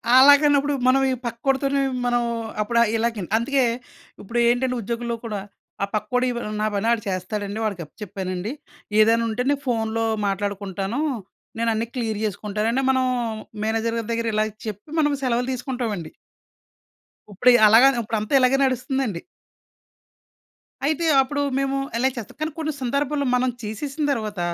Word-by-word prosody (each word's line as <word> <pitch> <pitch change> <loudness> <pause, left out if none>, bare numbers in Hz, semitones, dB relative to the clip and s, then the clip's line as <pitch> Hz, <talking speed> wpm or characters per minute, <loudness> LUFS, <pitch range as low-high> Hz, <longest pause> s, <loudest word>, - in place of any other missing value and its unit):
అలాగానప్పుడు 285 +1 +6
మనం 270 +1 +5
ఈ - - +1
పక్కోడితోనీ 270 +4 0 0.2
మనం 240 0 +2 0.4
అప్పుడు 235 +3 -1
ఆహ్, 235 - +3
ఇలాగి 225 -2 -1
న్ - - -17
అందుకే. 265 +3 +1 0.6
ఇప్పుడూ 230 +4 -2
ఏంటంటే, 250 +1 +1
ఉద్యోగుల్లో 235 +2 -3
కూడా 210 -3 -3 0.4
ఆ - - +3
పక్కోడి 250 +5 0
వ్ - - -3 0.2
నా 215 - +2
పని 210 +3 0
ఆడు 230 -2 +1
చేస్తాడండి. 200 +3 -3
వాడికి 200 -5 -2
అప్ప 150 - -25
చెప్పానండి. 185 +2 -4 0.5
ఏదైనుంటే 230 +2 +3
నే 285 - +4
ఫోనులో 225 -2 0 0.2
మాట్లాడుకుంటానూ. 200 +4 -2 0.6
నేనన్ని 230 0 0
క్లియర్ 220 -4 -2
జేసుకుంటానంటే, 215 +5 -1
మనం 260 -1 +2 0.6
మేనేజర్ 225 +1 0
గారి 225 0 -6
దగ్గర 230 0 -1
ఇలాగా 215 0 0
చెప్పి, 210 +6 -7
మనం 295 -1 +3
సెలవులు 250 0 0
తీసుకుంటావండి. 240 - -4 1.2
ఉప్పుడియి 245 +5 +5
అలాగాన 245 +6 +7
ఉప్పుడంతా 215 +1 -3
ఇలాగే 255 +1 +4
నడుస్తుందండి. 255 - -1 1.6
అయితే, 315 +3 0 0.2
అప్పుడూ 285 +2 -2 0.2
మేము 275 0 0 0.2
ఎలనే 260 +2 +3
చేస్తాం, 225 -3 -7
కానీ 310 +1 -1
కొన్ని 310 -1 -2
సందర్భాల్లో 280 +2 0
మనం 255 +1 +2
చేసేసిన 275 +8 -4
తర్వాత, 215 -6 -4
235 Hz, 135 wpm, -23 LUFS, 215-265 Hz, 1.6 s, అలాగాన